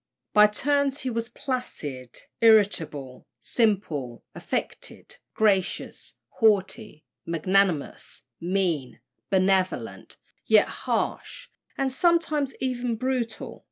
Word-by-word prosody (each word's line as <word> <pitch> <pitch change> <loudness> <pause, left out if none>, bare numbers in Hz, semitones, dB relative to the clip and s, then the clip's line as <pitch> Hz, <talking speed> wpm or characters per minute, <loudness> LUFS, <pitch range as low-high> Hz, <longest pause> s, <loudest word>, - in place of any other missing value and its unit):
By 210 0 +7
turns 280 +5 0
he 260 - -2
was 230 0 -3
placid, 150 - -5 0.2
irritable; 170 - +2
simple, 165 - -1
affected; - - -5 0.2
gracious, 200 -4 0
haughty; 210 - 0 0.2
magnanimous, 175 -1 0 0.2
mean; 170 -7 -1 0.3
benevolent, 190 -1 0 0.3
yet - - +5 0.2
harsh, - - -2 0.3
and 270 -1 0
sometimes 310 -2 +1
even 245 -2 -1
brutal. 245 -1 -3
210 Hz, 85 wpm, -25 LUFS, 175-250 Hz, 0.3 s, By